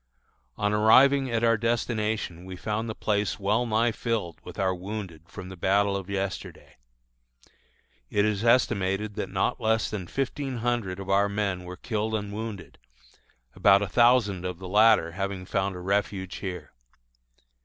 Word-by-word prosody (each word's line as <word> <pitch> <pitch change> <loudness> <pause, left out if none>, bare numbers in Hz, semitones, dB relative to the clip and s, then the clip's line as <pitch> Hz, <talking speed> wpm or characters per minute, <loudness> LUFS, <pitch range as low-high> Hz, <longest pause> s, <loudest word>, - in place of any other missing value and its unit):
On 105 0 0
arriving 130 +6 +5
at 115 -1 -1
our 115 -1 +4
destination 110 -5 -1
we 95 0 -8
found 110 +5 -3
the 110 - -4
place 105 -1 -1
well 105 +5 +1
nigh 115 +2 +2
filled 110 -8 -3
with - - -10
our 95 -1 +1
wounded 95 -3 -6
from 95 -2 -9
the 95 - -8
battle 100 +3 +2
of 100 -1 -5
yesterday. 100 -1 -5 1.3
It 100 0 +2
is 105 0 0
estimated 105 -4 +2
that 105 - -4
not 125 - -1
less 110 0 +1
than 95 -5 -4
fifteen 135 - -3
hundred 115 -6 -1
of 95 0 -4
our 100 +1 +3
men 100 -3 -2
were 90 0 -8
killed 110 0 -2
and 100 -1 -4
wounded, 110 -2 -7 0.7
about 100 0 +5
a - - -2
thousand 115 -3 +3
of 90 -1 -4
the 95 +1 -8
latter 105 -3 +4
having 95 +1 -4
found 95 0 -1
a - - -7
refuge 95 0 -2
here. 90 -5 -6
105 Hz, 160 wpm, -27 LUFS, 95-110 Hz, 1.3 s, arriving